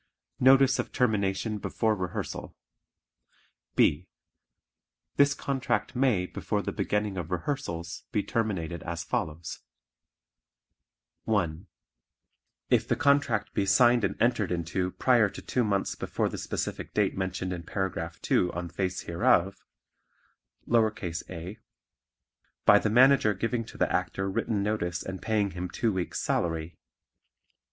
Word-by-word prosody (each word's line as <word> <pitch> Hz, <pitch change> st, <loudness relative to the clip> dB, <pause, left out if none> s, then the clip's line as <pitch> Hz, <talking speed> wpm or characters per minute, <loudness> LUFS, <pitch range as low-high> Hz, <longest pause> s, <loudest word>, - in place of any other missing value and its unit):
Notice 135 Hz, +1 st, +6 dB
of -, -, -2 dB
Termination 105 Hz, -2 st, 0 dB
Before 110 Hz, +2 st, 0 dB
Rehearsal 90 Hz, -3 st, -5 dB, 1.2 s
B. 75 Hz, +5 st, +3 dB, 1.1 s
This 140 Hz, 0 st, +5 dB
contract 130 Hz, -4 st, -2 dB
may 125 Hz, -8 st, +2 dB
before -, -, -3 dB
the -, -, -2 dB
beginning 105 Hz, -2 st, -1 dB
of 85 Hz, -3 st, -4 dB
rehearsals 85 Hz, -, -3 dB
be 105 Hz, -, 0 dB
terminated 90 Hz, -7 st, -2 dB
as 85 Hz, 0 st, -4 dB
follows: 80 Hz, +1 st, -3 dB, 1.7 s
(1) 95 Hz, -5 st, -1 dB, 1.0 s
If -, -, +3 dB
the -, -, +2 dB
contract 140 Hz, -6 st, +2 dB
be 100 Hz, -, 0 dB
signed 120 Hz, +3 st, +5 dB
and -, -, -1 dB
entered 115 Hz, -6 st, +2 dB
into 90 Hz, +2 st, -1 dB
prior 115 Hz, +1 st, +3 dB
to -, -, -9 dB
two 125 Hz, -, -1 dB
months 100 Hz, -3 st, 0 dB
before -, -, -2 dB
the -, -, -6 dB
specific -, -, -4 dB
date -, -, +2 dB
mentioned 95 Hz, -1 st, -2 dB
in 90 Hz, -, -5 dB
Paragraph 85 Hz, -2 st, -3 dB
2 90 Hz, -, +2 dB
on 85 Hz, 0 st, -4 dB
face 90 Hz, +2 st, -2 dB
hereof; 95 Hz, +1 st, +2 dB, 1.1 s
(a) 95 Hz, -4 st, -1 dB, 1.1 s
By 105 Hz, 0 st, +8 dB
the 110 Hz, -, 0 dB
Manager 125 Hz, -2 st, +5 dB
giving 115 Hz, +4 st, -1 dB
to -, -, -12 dB
the -, -, +1 dB
Actor 95 Hz, 0 st, -1 dB
written 100 Hz, +1 st, -1 dB
notice 85 Hz, -5 st, -1 dB
and 95 Hz, 0 st, -6 dB
paying 105 Hz, -3 st, 0 dB
him 90 Hz, 0 st, -5 dB
two 110 Hz, +4 st, 0 dB
weeks' 90 Hz, -2 st, -2 dB
salary. 80 Hz, -1 st, -1 dB
100 Hz, 125 wpm, -28 LUFS, 90-115 Hz, 1.7 s, By